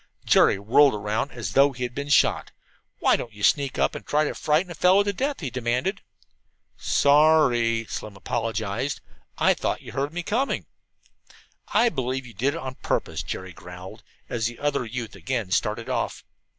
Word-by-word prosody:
Jerry -, -, +5 dB
whirled 120 Hz, +6 st, +4 dB
around 105 Hz, +6 st, -2 dB
as 110 Hz, -6 st, -5 dB
though 140 Hz, 0 st, +5 dB
he 125 Hz, 0 st, -5 dB
had 120 Hz, 0 st, -3 dB
been 140 Hz, +2 st, -5 dB
shot. 145 Hz, -, +3 dB, 0.5 s
"Why -, -, +3 dB
don't 115 Hz, -, -5 dB
you 105 Hz, 0 st, -10 dB
sneak 140 Hz, +2 st, +2 dB
up -, -, +1 dB
and -, -, -7 dB
try 150 Hz, +1 st, +1 dB
to 150 Hz, -, -2 dB
frighten 160 Hz, +4 st, 0 dB
a -, -, -4 dB
fellow 185 Hz, +5 st, +4 dB
to 200 Hz, 0 st, -1 dB
death?" 275 Hz, +4 st, -2 dB
he 135 Hz, -6 st, -4 dB
demanded. 125 Hz, -, -1 dB, 0.7 s
"Sorry," 140 Hz, -6 st, +3 dB
Slim 105 Hz, -2 st, -6 dB
apologized. 115 Hz, +4 st, -2 dB, 0.4 s
"Thought -, -, +1 dB
you -, -, -9 dB
heard 140 Hz, +2 st, -2 dB
me 175 Hz, +1 st, -4 dB
coming." 245 Hz, +9 st, -1 dB, 1.0 s
"I 240 Hz, -, +3 dB
believe 130 Hz, -, -3 dB
you 120 Hz, -, -12 dB
did 130 Hz, +8 st, 0 dB
it -, -, -4 dB
on 130 Hz, 0 st, -6 dB
purpose," -, -, -1 dB
Jerry 95 Hz, -1 st, -6 dB
growled, 90 Hz, +2 st, -11 dB, 0.3 s
as 115 Hz, -1 st, -1 dB
the 120 Hz, 0 st, -7 dB
other 145 Hz, -3 st, -1 dB
youth 115 Hz, 0 st, -5 dB
again 120 Hz, -8 st, -3 dB
started -, -, 0 dB
off. -, -, -2 dB
130 Hz, 175 wpm, -25 LUFS, 115-150 Hz, 1.0 s, Jerry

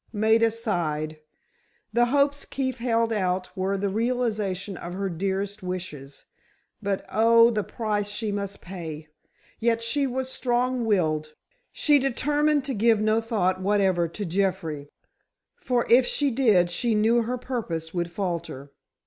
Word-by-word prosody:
Maida 220 Hz, +1 st, +3 dB
sighed. 160 Hz, -9 st, -2 dB, 0.7 s
The 240 Hz, +1 st, +4 dB
hopes 280 Hz, +2 st, +1 dB
Keefe 260 Hz, -2 st, -3 dB
held 230 Hz, -1 st, +1 dB
out 185 Hz, -3 st, -1 dB
were 195 Hz, +1 st, -1 dB
the 200 Hz, +1 st, -1 dB
realization 215 Hz, -3 st, -1 dB
of 175 Hz, 0 st, -7 dB
her 195 Hz, 0 st, -2 dB
dearest 195 Hz, +4 st, -3 dB
wishes—but, 180 Hz, +3 st, -7 dB
oh, 230 Hz, +2 st, +5 dB
the 215 Hz, -2 st, -1 dB
price 210 Hz, -2 st, -2 dB
she 210 Hz, +1 st, -3 dB
must 200 Hz, -1 st, -4 dB
pay! 160 Hz, -4 st, -7 dB, 0.5 s
Yet 230 Hz, 0 st, +1 dB
she 275 Hz, +4 st, +1 dB
was 260 Hz, +1 st, -3 dB
strong 250 Hz, -1 st, 0 dB
willed. 155 Hz, -7 st, 0 dB, 0.4 s
She 295 Hz, -2 st, +3 dB
determined 290 Hz, +2 st, +1 dB
to 270 Hz, -, -2 dB
give 225 Hz, 0 st, +3 dB
no 215 Hz, +1 st, +2 dB
thought 190 Hz, -5 st, 0 dB
whatever 190 Hz, -3 st, +2 dB
to 200 Hz, +5 st, -5 dB
Jeffrey, 165 Hz, -5 st, -2 dB, 0.7 s
for 245 Hz, -2 st, 0 dB
if 245 Hz, +1 st, +5 dB
she 285 Hz, -2 st, +1 dB
did 215 Hz, -9 st, +3 dB
she 225 Hz, +6 st, +1 dB
knew 225 Hz, +3 st, +3 dB
her 245 Hz, +2 st, -2 dB
purpose 210 Hz, -11 st, -4 dB
would 175 Hz, -1 st, -2 dB
falter. 170 Hz, -7 st, -4 dB
210 Hz, 140 wpm, -25 LUFS, 185-235 Hz, 0.7 s, oh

